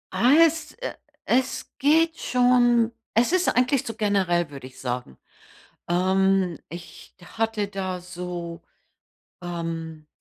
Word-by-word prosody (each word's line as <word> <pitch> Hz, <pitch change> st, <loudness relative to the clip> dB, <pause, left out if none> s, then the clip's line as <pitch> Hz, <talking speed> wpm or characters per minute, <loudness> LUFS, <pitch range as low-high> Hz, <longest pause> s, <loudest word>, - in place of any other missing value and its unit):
Ah, 255 Hz, +5 st, +5 dB
es, 315 Hz, -1 st, -2 dB
äh -, -, -5 dB, 0.3 s
es 260 Hz, +1 st, 0 dB
geht 320 Hz, +4 st, +3 dB
schon 240 Hz, -2 st, +3 dB, 0.2 s
es 235 Hz, +7 st, +3 dB
ist 370 Hz, 0 st, +2 dB
eigentlich 250 Hz, +1 st, +2 dB
so 225 Hz, -, -4 dB
generell, 185 Hz, -6 st, +1 dB
würde 135 Hz, -2 st, -9 dB
ich 130 Hz, -, -16 dB
sagen. 125 Hz, -, -4 dB, 0.7 s
Ähm, 190 Hz, -1 st, +2 dB
ich 170 Hz, +1 st, -11 dB
hatte 220 Hz, +1 st, -2 dB
da 190 Hz, -2 st, -4 dB
so, 175 Hz, -1 st, -6 dB, 0.8 s
ähm, 165 Hz, -2 st, -5 dB
195 Hz, 120 wpm, -24 LUFS, 170-245 Hz, 0.8 s, Ah